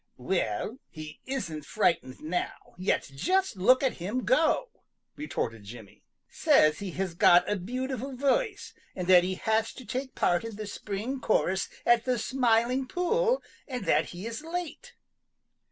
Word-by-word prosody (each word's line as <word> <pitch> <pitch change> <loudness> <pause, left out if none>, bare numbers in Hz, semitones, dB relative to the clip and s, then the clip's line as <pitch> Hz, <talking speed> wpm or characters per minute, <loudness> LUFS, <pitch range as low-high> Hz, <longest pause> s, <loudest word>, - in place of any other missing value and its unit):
"Well, 190 - -2
he 155 -1 -9
isn't 170 - -4
frightened 170 -9 0
now, 165 +4 -4
yet 185 - +1
just 370 - +1
look 255 +9 +4
at 265 - 0
him 215 +8 -2
go," - - +2 0.5
retorted 115 - -4
Jimmy. 105 -1 -12 0.3
"Says 155 0 +3
he 200 -2 -4
has 190 -2 -2
got 175 +1 +5
a 210 - +1
beautiful 255 +6 -4
voice, 395 - 0 0.2
and 180 - -3
that 180 -1 +7
he 185 +1 -1
has 220 +3 0
to 255 - -11
take 260 +4 -4
part 175 +2 +2
in 225 -2 -6
the 215 +1 -6
spring 210 +6 -4
chorus 190 -3 +1 0.2
at 240 -1 +4
the 255 -1 +1
Smiling 250 +1 +1
Pool 460 - +1 0.2
and 250 -7 -5
that - - +3
he 180 +3 -8
is 230 +2 -5
late." 355 +8 -5
225 Hz, 155 wpm, -28 LUFS, 180-265 Hz, 0.5 s, that